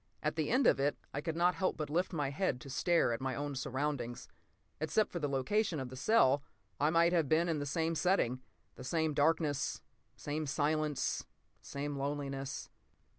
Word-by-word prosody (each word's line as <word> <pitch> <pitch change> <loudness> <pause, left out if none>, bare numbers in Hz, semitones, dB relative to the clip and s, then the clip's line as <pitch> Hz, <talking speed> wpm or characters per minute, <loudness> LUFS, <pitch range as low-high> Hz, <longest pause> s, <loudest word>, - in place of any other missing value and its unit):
At 150 0 0
the 155 -2 -1
end 255 +1 +3
of - - +5
it 145 +2 +1 0.2
I 145 - -2
could 160 +1 -3
not 175 +2 +3
help 185 0 -1
but 155 - -2
lift 175 +6 0
my 145 -5 -1
head 140 -4 0
to 135 - -9
stare 165 -3 +2
at 115 - -4
my 130 -1 -1
own 145 0 -3
surroundings. 130 -2 -3 0.5
Except 160 +8 +1
for 175 - -3
the 145 -3 -1
location 160 +6 0
of 130 -2 -4
the 130 - -8
cell, 140 - +4 0.4
I 150 - +3
might 170 +1 +4
have 165 -6 +2
been 165 +2 +3
in 160 -3 0
they 145 - -3
same 160 +3 0
setting. 155 -8 +1 0.4
The - - -8
same 160 +3 0
darkness, 145 -1 +1 0.3
same 150 +1 -3
silence, 150 +1 0 0.3
same 145 0 -4
loneliness. 140 -1 -3
150 Hz, 185 wpm, -34 LUFS, 140-165 Hz, 0.5 s, of